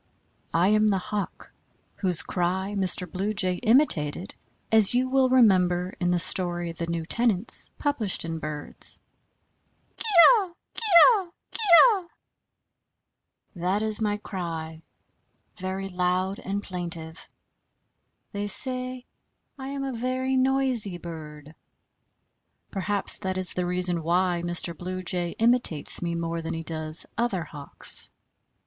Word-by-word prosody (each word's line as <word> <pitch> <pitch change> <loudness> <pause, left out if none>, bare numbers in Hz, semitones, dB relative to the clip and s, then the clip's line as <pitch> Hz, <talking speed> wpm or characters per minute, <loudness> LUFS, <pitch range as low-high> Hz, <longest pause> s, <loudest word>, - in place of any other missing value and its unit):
I 175 +3 +3
am 215 0 +3
the 195 - +1
Hawk 200 +2 -6 0.4
whose 180 -4 -1
cry 190 +2 -2
Mr. 185 -2 +1
Blue 195 +5 -4
Jay 185 -2 -1
imitated, 200 - +1 0.4
as 220 0 +5
you 255 +1 +1
will 260 0 +2
remember, 185 -7 +3
in 175 -1 0
the 180 - +1
story 175 -1 +3
"The 165 0 -6
New 170 -1 -3
Tenants," 225 +1 +4
published 235 - -2
in 165 0 -5
Birds. 150 -1 -5 1.0
Kee - - -8 0.3
oe, 390 -8 0 0.2
kee - - -8 0.3
oe, 380 -6 -3 0.2
kee - - -8 0.2
oe, 400 -8 +2 1.5
that 185 +4 -1
is 215 0 0
my 210 -1 0
cry, 165 -5 -6 0.8
very 190 0 -5
loud 185 +1 -2
and 200 +1 -4
plaintive; 170 -3 -7 1.0
they 205 0 -4
say 255 +3 +2 0.5
I 265 - -7
am 275 0 -5
a 270 -1 -4
very 255 +2 -2
noisy 260 -7 0
bird; 155 -3 -10 1.2
perhaps 200 0 0
that 190 0 -4
is 185 -1 -1
the 180 -1 -2
reason 180 -1 0
why 175 +1 0
Mr. 175 0 -2
Blue 185 +2 -6
Jay 175 -1 -2
imitates 230 -9 0
me 170 -1 -3
more 165 0 -3
than 165 - -5
he 165 - -6
does 155 0 +2
other 205 -7 -1
Hawks. 145 -3 -1
185 Hz, 130 wpm, -25 LUFS, 170-225 Hz, 1.5 s, as